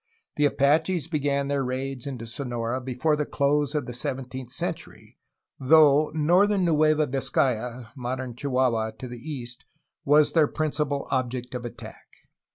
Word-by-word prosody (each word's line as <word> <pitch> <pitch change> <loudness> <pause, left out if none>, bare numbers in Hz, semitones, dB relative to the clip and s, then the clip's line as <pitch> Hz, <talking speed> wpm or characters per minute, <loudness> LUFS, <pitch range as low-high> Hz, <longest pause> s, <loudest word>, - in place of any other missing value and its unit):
The 150 - +2
Apaches 155 +4 +2
began 140 -3 0
their 140 -1 0
raids 130 0 -4
into 125 -4 -5
Sonora 120 0 -3
before 130 +5 0
the 150 - -1
close 145 +1 0
of 145 -4 -1
the 120 - -6
seventeenth 130 -1 -5
century, - - -6 0.4
though 150 +1 +5
northern 185 +5 +3
Nueva 155 -1 +3
Vizcaya 125 -3 -1
(modern 130 -1 -4
Chihua 130 0 +1
hua) 110 -1 -1
to 130 - -7
the 120 -1 -8
east 125 -3 -8 0.4
was 150 +1 +4
their 155 -3 +4
principal 150 -2 -2
object 125 -1 -2
of 125 -1 -5
attack. 120 - -10
135 Hz, 145 wpm, -25 LUFS, 125-150 Hz, 0.4 s, though